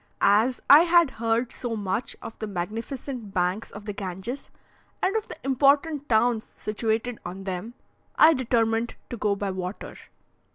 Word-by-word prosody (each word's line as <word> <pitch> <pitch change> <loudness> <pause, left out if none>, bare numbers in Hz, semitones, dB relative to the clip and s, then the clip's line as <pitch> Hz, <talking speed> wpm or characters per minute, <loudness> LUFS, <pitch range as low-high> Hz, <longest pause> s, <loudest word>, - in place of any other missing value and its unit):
As 220 +6 +3
I 290 - +10
had 340 -3 +5
heard 230 +2 0
so 240 -2 -4
much 205 +2 -2
of 225 - -9
the 215 - -4
magnificent 220 +4 -5
banks 180 +4 0
of 205 0 -10
the 210 - -4
Ganges, 195 +7 -5 0.5
and 380 +3 0
of 440 -1 -1
the - - -8
important 285 +2 +2
towns 225 0 +2
situated 220 +2 -2
on 185 +2 -7
them, 190 +5 -5 0.4
I 320 +1 +7
determined 230 -3 0 0.2
to 240 - -4
go 210 -2 +1
by 200 -1 -2
water. 185 +1 -6
225 Hz, 155 wpm, -26 LUFS, 200-260 Hz, 0.5 s, I